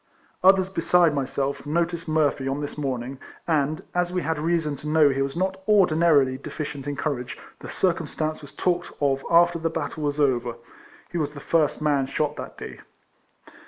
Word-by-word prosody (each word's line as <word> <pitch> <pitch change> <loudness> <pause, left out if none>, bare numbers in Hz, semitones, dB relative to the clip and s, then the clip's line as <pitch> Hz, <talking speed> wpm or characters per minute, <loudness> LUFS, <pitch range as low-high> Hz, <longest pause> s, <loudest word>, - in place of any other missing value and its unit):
Others 190 0 +5
besides 175 -3 +3
myself 140 0 -2
noticed 170 +2 -1
Murphy 145 -3 +1
on 135 +2 -1
this 145 -1 -5
morning, 130 -2 -4 0.3
and, 155 -1 0
as 180 0 0
we 180 -1 -1
had 160 -1 -1
reason 160 -2 0
to 150 +3 -8
know 155 -1 +5
he 135 0 0
was 135 +1 -2
not 190 +2 -1
ordinarily 160 -9 +4
deficient 145 -1 -6
in 145 - -2
courage, 140 -4 -3 0.2
the - - -9
circumstance 155 -3 -1
was 145 -2 -11
talked 175 -1 -1
of 135 -1 +1
after 170 0 +4
the 165 0 0
battle 160 -1 -4
was 145 0 -1
over. 125 -4 +1 0.6
He 175 - -2
was 150 -1 -2
the - - -7
first 155 0 +1
man 140 -3 +2
shot 150 +2 -1
that - - -8
day. - - -8
150 Hz, 175 wpm, -24 LUFS, 140-170 Hz, 0.6 s, Others